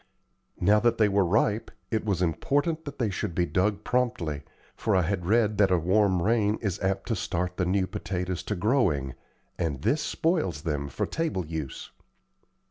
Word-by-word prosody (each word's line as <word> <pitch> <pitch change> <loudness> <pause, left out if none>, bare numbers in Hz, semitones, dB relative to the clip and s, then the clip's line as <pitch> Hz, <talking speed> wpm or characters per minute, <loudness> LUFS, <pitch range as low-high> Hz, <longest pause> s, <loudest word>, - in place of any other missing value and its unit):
Now 105 +4 +4
that 115 +1 +2
they 110 - +4
were 100 -1 +3
ripe, 105 +4 +1 0.2
it 110 -2 0
was 95 -4 0
important 145 - 0
that 145 - -7
they 115 -5 0
should 95 -2 -3
be 90 - +2
dug 100 +4 0
promptly, 120 - -1 0.3
for 110 - 0
I 90 - +4
had 90 0 -2
read 110 -1 +2
that 100 -2 +5
a 90 - +4
warm 95 +1 +2
rain 110 0 +2
is 100 -5 -2
apt 95 0 -1
to 115 - +1
start 90 -1 -2
the 90 - 0
new 95 +1 +2
potatoes 90 -1 -3
to 105 - -2
growing, 90 - +1 0.5
and 75 -6 -2
this 150 +2 +2
spoils 155 - 0
them 75 -3 -2
for - - -2
table 155 - -2
use. 80 -4 -6
95 Hz, 180 wpm, -27 LUFS, 85-110 Hz, 0.5 s, that